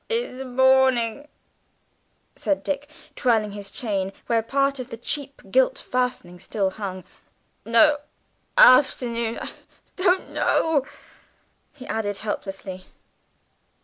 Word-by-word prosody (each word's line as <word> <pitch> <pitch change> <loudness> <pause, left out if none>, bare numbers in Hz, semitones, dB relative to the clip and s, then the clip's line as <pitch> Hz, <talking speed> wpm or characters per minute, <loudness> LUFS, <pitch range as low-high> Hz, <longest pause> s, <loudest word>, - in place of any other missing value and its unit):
"In 460 - -2
the 265 - -5
morning," 260 0 +3 1.1
said 295 - -1
Dick, 290 0 -3 0.3
twirling 225 -5 +1
his 200 -1 -7
chain, 195 -5 -2
where 230 -1 +2
part 275 +3 0
of 255 0 -6
the 230 - -7
cheap 275 +4 -5
gilt - - +3
fastening 250 -9 -3
still 195 +1 -1
hung. 190 -2 -6 0.6
"No; 290 +6 +5 0.6
afternoon. 240 - +5
I - - -6 0.5
don't 370 0 +1
know," 295 -4 +1 0.8
he 260 -3 -12
added 205 -2 -2
helplessly. 195 -3 -5
250 Hz, 110 wpm, -24 LUFS, 210-280 Hz, 1.1 s, No